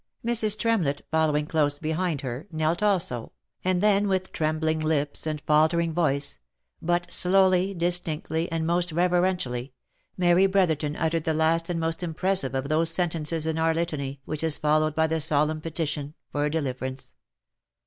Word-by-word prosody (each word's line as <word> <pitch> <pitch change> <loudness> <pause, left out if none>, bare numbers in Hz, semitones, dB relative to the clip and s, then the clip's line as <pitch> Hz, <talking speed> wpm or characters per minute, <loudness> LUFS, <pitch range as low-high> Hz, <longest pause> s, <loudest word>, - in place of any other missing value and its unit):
Mrs. 220 -3 +3
Tremlett 200 -12 0
following 155 -2 +1
close 150 -2 +1
behind 160 0 -2
her, 130 +4 -6
knelt 160 +2 0
also, 175 - 0 0.3
and 185 0 +1
then 205 -1 +3
with 185 -1 -1
trembling 155 0 -1
lips, 155 -1 -1
and 155 -1 -2
faltering 160 +3 +2
voice, 140 - +1 0.4
but 175 +1 -1
slowly, 190 +1 +3
distinctly, 170 -2 -1
and 165 -1 -1
most 175 +1 0
reverentially, 175 -7 0 0.4
Mary 180 +1 +4
Brotherton 160 -6 +1
uttered 160 0 -1
the 160 - 0
last 165 +2 +1
and 170 -1 -1
most 165 +1 -2
impressive 170 -4 -1
of 135 +1 -2
those 160 +2 +2
sentences 165 -2 0
in 160 0 -1
our 160 0 +2
litany 140 -5 -3
which 155 0 -3
is 160 -2 +1
followed 155 0 +1
by 160 - +3
the 160 0 -1
solemn 155 0 +1
petition 155 -2 -4 0.2
for 145 0 0
deliverance. 130 -3 -4
160 Hz, 150 wpm, -26 LUFS, 150-175 Hz, 0.4 s, Mary